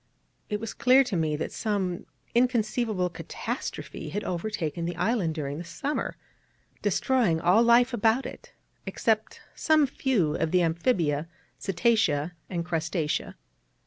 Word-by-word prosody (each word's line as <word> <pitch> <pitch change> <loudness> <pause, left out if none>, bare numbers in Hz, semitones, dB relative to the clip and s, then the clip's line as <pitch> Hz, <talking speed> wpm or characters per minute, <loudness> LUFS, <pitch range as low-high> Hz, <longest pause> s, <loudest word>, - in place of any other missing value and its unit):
It 210 -1 -1
was 225 0 -5
clear 255 +2 +5
to 245 -7 -3
me 155 -3 +1
that 150 - -3
some 195 -5 -2 0.3
inconceivable 230 -5 +1
catastrophe 175 - -5
had 205 - -3
overtaken 170 -3 -3
the 175 0 -3
island 180 -4 0
during 145 -1 -3
the - - -5
summer, 270 - -3 0.6
destroying 240 -12 +2
all 180 +7 +4
life 240 +2 +5
about 230 +3 +2
it, - - -9 0.4
except 220 -1 0
some 310 -2 +3
few 245 - 0
of - - 0
the 180 +1 +3
amphibia, 165 - +1 0.3
cetacea, 195 -6 +1 0.2
and 170 -3 -3
crustacea. 160 -2 -2
195 Hz, 130 wpm, -27 LUFS, 165-235 Hz, 0.6 s, clear